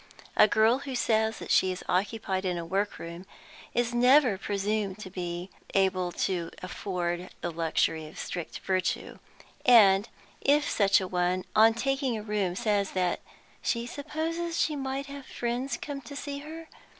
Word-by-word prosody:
A 215 Hz, -, +7 dB
girl 220 Hz, +4 st, +4 dB
who 275 Hz, -2 st, -5 dB
says 220 Hz, -2 st, +1 dB
that -, -, -6 dB
she 185 Hz, -, +4 dB
is 185 Hz, -, -6 dB
occupied 190 Hz, 0 st, 0 dB
in 180 Hz, -2 st, -1 dB
a 170 Hz, -, -4 dB
workroom 185 Hz, -1 st, -3 dB, 0.5 s
is 240 Hz, 0 st, +1 dB
never 250 Hz, -1 st, +5 dB
presumed 200 Hz, 0 st, -2 dB
to 195 Hz, -3 st, -9 dB
be 175 Hz, 0 st, -5 dB, 0.2 s
able 185 Hz, -2 st, +2 dB
to 175 Hz, -4 st, -2 dB
afford 180 Hz, -1 st, -3 dB
the 175 Hz, -, -2 dB
luxury 160 Hz, -1 st, 0 dB
of 155 Hz, -, -13 dB
strict 175 Hz, -2 st, -5 dB
virtue, 185 Hz, -1 st, -1 dB, 0.4 s
and 210 Hz, -3 st, +6 dB, 0.3 s
if 295 Hz, +1 st, +3 dB
such 200 Hz, -2 st, +3 dB
a 185 Hz, -, -3 dB
one, 180 Hz, 0 st, 0 dB
on 225 Hz, +1 st, +6 dB
taking 270 Hz, -1 st, 0 dB
a 210 Hz, -, -6 dB
room, 205 Hz, -4 st, -1 dB
says 205 Hz, -2 st, 0 dB
that 180 Hz, -2 st, 0 dB, 0.4 s
"she 235 Hz, 0 st, -1 dB
supposes 320 Hz, +5 st, -3 dB
she 305 Hz, -, +1 dB
may 270 Hz, 0 st, -3 dB
have 280 Hz, -1 st, -9 dB
friends 245 Hz, +3 st, -2 dB
come 285 Hz, -2 st, -5 dB
to 270 Hz, +3 st, -10 dB
see 280 Hz, 0 st, -5 dB
her?" 320 Hz, +3 st, -9 dB
210 Hz, 160 wpm, -28 LUFS, 185-260 Hz, 0.5 s, A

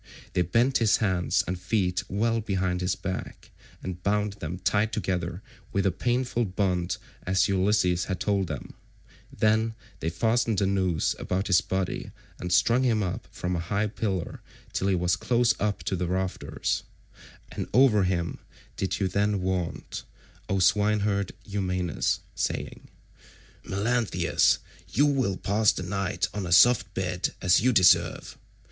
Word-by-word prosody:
They -, -, +2 dB
bent 115 Hz, -, +2 dB
his 115 Hz, -3 st, +4 dB
hands 95 Hz, -6 st, +1 dB
and 90 Hz, 0 st, -3 dB
feet 90 Hz, -1 st, 0 dB
well 115 Hz, +3 st, +1 dB
behind 95 Hz, -3 st, -1 dB
his 90 Hz, +1 st, 0 dB
back, 95 Hz, -1 st, -6 dB, 0.3 s
and 90 Hz, -1 st, -5 dB
bound 105 Hz, +1 st, 0 dB
them 90 Hz, -3 st, -6 dB
tight 105 Hz, +5 st, 0 dB, 0.7 s
with 100 Hz, -1 st, 0 dB
a 95 Hz, -, +3 dB
painful 120 Hz, +4 st, 0 dB
bond 90 Hz, -2 st, -1 dB, 0.2 s
as 95 Hz, +1 st, +2 dB
Ulysses 95 Hz, -2 st, +2 dB
had 95 Hz, -3 st, -3 dB
told 100 Hz, -2 st, 0 dB
them; 80 Hz, -4 st, -6 dB, 0.6 s
then 110 Hz, +1 st, +1 dB, 0.2 s
they 80 Hz, -, -1 dB
fastened 115 Hz, +5 st, +1 dB
a 100 Hz, -, +2 dB
noose 95 Hz, -4 st, +1 dB
about 95 Hz, +2 st, -1 dB
his 95 Hz, -4 st, +4 dB
body 95 Hz, -1 st, -3 dB, 0.3 s
and 90 Hz, -, -4 dB
strung 120 Hz, +7 st, +4 dB
him 115 Hz, -5 st, +2 dB
up 90 Hz, -, -4 dB
from 90 Hz, 0 st, -3 dB
a -, -, -1 dB
high 100 Hz, +5 st, -1 dB
pillar 100 Hz, -4 st, -3 dB, 0.3 s
till 95 Hz, -, 0 dB
he 95 Hz, -, +3 dB
was 90 Hz, 0 st, +1 dB
close 120 Hz, -1 st, +2 dB
up 105 Hz, -1 st, -1 dB
to -, -, -1 dB
the 90 Hz, -1 st, -2 dB
rafters, 95 Hz, +1 st, -2 dB, 0.7 s
and -, -, -4 dB
over 125 Hz, -5 st, +5 dB
him 90 Hz, -2 st, -1 dB, 0.4 s
did 95 Hz, -, -2 dB
you 95 Hz, -, +1 dB
then 100 Hz, +2 st, +1 dB
vaunt, 90 Hz, -2 st, -3 dB, 0.5 s
O 95 Hz, -, +1 dB
swineherd 100 Hz, +1 st, +2 dB
Eumaeus 90 Hz, -4 st, -1 dB
saying, -, -, -3 dB, 0.8 s
"Melanthius, 115 Hz, +3 st, +1 dB, 0.3 s
you 145 Hz, -, +3 dB
will 130 Hz, -10 st, +1 dB
pass 105 Hz, +1 st, +3 dB
the -, -, -5 dB
night 100 Hz, +1 st, -1 dB
on 100 Hz, -3 st, -3 dB
a -, -, -5 dB
soft 100 Hz, +1 st, +6 dB
bed 90 Hz, -1 st, -2 dB
as 90 Hz, +1 st, +4 dB
you 130 Hz, +3 st, +3 dB
deserve. 95 Hz, -6 st, +3 dB
95 Hz, 150 wpm, -27 LUFS, 90-105 Hz, 0.8 s, soft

